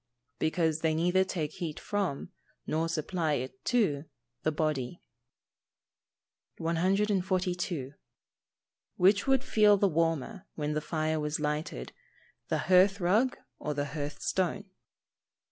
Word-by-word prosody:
_ - - -48
Because 160 -1 +1
they 160 -1 +1
neither 180 +3 +3
take 160 -5 -3
heat 165 -3 -5
from, 195 -9 -2 0.3
nor 160 +2 0
supply 165 0 -1
it 130 +8 -4
to, 185 - +1 0.4
the 155 - +1
body. 150 -1 -1 1.6
142. 180 -3 0 1.1
_Which 200 +5 +4
would 270 -1 +3
feel 210 -2 +5
the 200 - +3
warmer, 165 +4 -1
when 150 -1 -2
the 150 - -1
fire 155 0 -1
was 150 +1 -2
lighted, 150 - -3 0.6
the - - 0
hearth 190 +3 +5
rug 215 +9 +2 0.2
or 150 -1 -3
the 145 0 -1
hearth 150 -1 -4
stone? 190 +2 0
165 Hz, 120 wpm, -30 LUFS, 150-190 Hz, 1.6 s, feel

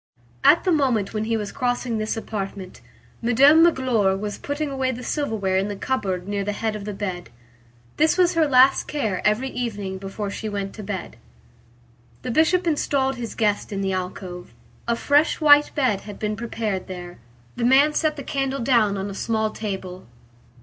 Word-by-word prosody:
At 335 - +6
the 370 - +1
moment 255 - +1
when 215 0 -2
he 225 0 0
was 210 -2 -4
crossing 245 -3 -1
this 215 +1 -2
apartment, 195 -4 -6 0.4
Madame 275 +7 +6
Magloire 250 - +3
was 205 +1 -5
putting 290 0 -3
away 265 -1 -1
the 250 0 -7
silverware 220 -12 -1
in 195 +1 0
the 205 - -4
cupboard 195 -6 -2
near 200 -1 -2
the 205 +1 -2
head 220 +1 -2
of 205 -1 -7
the 210 - -4
bed. 185 -3 -5 0.7
This 310 +3 +3
was 360 -1 +4
her 325 -2 +3
last 265 0 +5
care 220 -11 -2
every 215 +6 +1
evening 205 -6 -4
before 200 +1 -5
she 215 +1 -5
went 200 -1 -4
to 215 - -8
bed. 195 - -6 1.1
The 250 - -3
Bishop 325 +7 +3
installed 275 -4 0
his 235 -2 -6
guest 210 -2 0
in 200 -1 -3
the 190 -1 -1
alcove. 180 - -6 0.3
A 235 - +2
fresh 290 +6 +2
white 295 -2 +6
bed 255 -9 +1
had 205 -1 -9
been 215 0 -2
prepared 220 -4 -3
there. 180 -1 -8 0.4
The 240 - -3
man 275 +5 +5
set 310 -1 +1
the 280 - -7
candle 270 0 -2
down 230 -5 +2
on 195 +1 -3
a 200 - -6
small 220 +1 -1
table. 190 - -6
220 Hz, 185 wpm, -23 LUFS, 200-270 Hz, 1.1 s, At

